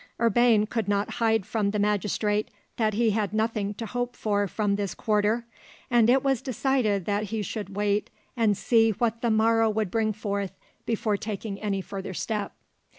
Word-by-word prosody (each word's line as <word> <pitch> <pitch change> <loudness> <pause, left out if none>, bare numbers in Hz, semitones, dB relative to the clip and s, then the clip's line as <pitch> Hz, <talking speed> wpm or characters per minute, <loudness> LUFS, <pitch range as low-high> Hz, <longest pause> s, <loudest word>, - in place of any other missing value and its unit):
Urbain 230 -1 +4
could 225 -1 -2
not 205 0 0
hide 225 -3 +2
from 210 -1 0
the 210 - -1
magistrate 210 +1 0 0.3
that 215 -2 +1
he 225 0 +3
had 210 -1 -1
nothing 215 -2 -1
to 225 - -5
hope 245 +2 -3
for 205 -2 0
from 205 +1 0
this 200 -3 -3
quarter, 215 +2 +1 0.5
and 235 -1 +5
it 260 +1 +4
was 270 -4 +1
decided 250 -7 0
that 205 +1 0
he 215 +1 -3
should 200 -1 -5
wait 205 0 0 0.3
and 220 -5 +2
see 225 -2 +4
what 230 +1 -1
the 235 - +1
morrow 225 +1 +3
would 215 -3 -1
bring 220 -1 +1
forth, 200 -2 -3 0.3
before 215 -2 0
taking 205 -1 -5
any 200 -2 -1
further 190 0 -6
step. 210 0 -3
215 Hz, 175 wpm, -26 LUFS, 205-225 Hz, 0.5 s, and